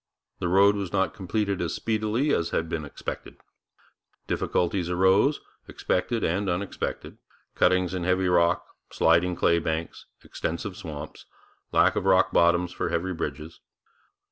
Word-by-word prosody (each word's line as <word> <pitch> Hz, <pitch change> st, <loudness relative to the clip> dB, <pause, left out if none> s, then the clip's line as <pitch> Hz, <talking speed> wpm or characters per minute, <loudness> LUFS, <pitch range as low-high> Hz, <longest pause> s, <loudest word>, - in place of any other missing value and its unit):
The 90 Hz, -, -1 dB
road 100 Hz, +3 st, +5 dB
was 100 Hz, -3 st, -4 dB
not 95 Hz, -1 st, 0 dB
completed 100 Hz, +1 st, -2 dB
as 85 Hz, -2 st, -2 dB
speedily 110 Hz, +6 st, 0 dB
as 85 Hz, 0 st, 0 dB
had 80 Hz, -, -1 dB
been 80 Hz, -2 st, -4 dB
expected. 70 Hz, -, -7 dB, 0.9 s
Difficulties 90 Hz, 0 st, -1 dB
arose, 95 Hz, +10 st, +3 dB, 0.3 s
expected 115 Hz, +5 st, -1 dB
and 95 Hz, +4 st, 0 dB
unexpected 90 Hz, +3 st, -4 dB, 0.3 s
cuttings 90 Hz, 0 st, +2 dB
in 90 Hz, -2 st, -3 dB
heavy 90 Hz, +1 st, +1 dB
rock, 85 Hz, -1 st, +2 dB, 0.2 s
sliding 85 Hz, +2 st, +2 dB
clay 85 Hz, 0 st, +3 dB
banks, 80 Hz, 0 st, -4 dB, 0.2 s
extensive 90 Hz, +4 st, -4 dB
swamps, 75 Hz, -3 st, -8 dB, 0.4 s
lack -, -, +4 dB
of -, -, -2 dB
rock -, -, +4 dB
bottom 85 Hz, +1 st, +3 dB
for 90 Hz, -, -4 dB
heavy 95 Hz, +3 st, -1 dB
bridges. 75 Hz, 0 st, -6 dB
90 Hz, 135 wpm, -26 LUFS, 85-95 Hz, 0.9 s, road